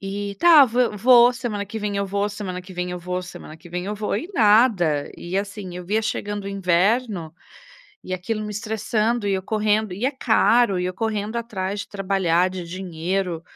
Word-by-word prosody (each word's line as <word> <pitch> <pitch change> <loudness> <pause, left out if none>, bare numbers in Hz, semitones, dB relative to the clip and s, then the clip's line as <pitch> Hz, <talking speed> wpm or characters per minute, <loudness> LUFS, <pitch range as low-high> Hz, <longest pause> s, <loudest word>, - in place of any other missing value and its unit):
E 200 +1 -5
tá, 315 - +8
vou, 240 +1 +4
semana 230 -5 -4
que 210 - -8
vem 205 -1 -3
eu 200 0 -1
vou, 200 +1 -1
semana 195 -3 -6
que 185 +1 -12
vem 180 0 -3
eu 180 - -4
vou, 180 +1 -3
semana 165 -3 -10
que 175 +2 -15
vem 180 +2 -4
eu 205 - -3
vou, 210 -1 -2
e 285 - -5
nada. 205 - +3
E 175 +2 -5
assim, 200 -3 -5
via 210 +5 0
chegando 205 -1 -3
o - - -4
inverno, 195 -1 0 0.7
e - - -6
aquilo 200 +4 -3
me 210 - -5
estressando 220 +1 -1
e 200 - +1
eu 190 -1 -1
correndo, 215 0 0
e 205 +6 -5
é - - +2
caro, 240 -5 +3
e 180 - -1
eu 180 - -2
correndo 215 +1 -2
atrás 205 -4 -3
de - - -8
trabalhar, 185 -3 +1
de 185 -1 -6
dinheiro, 180 0 -3
200 Hz, 195 wpm, -22 LUFS, 180-220 Hz, 0.7 s, tá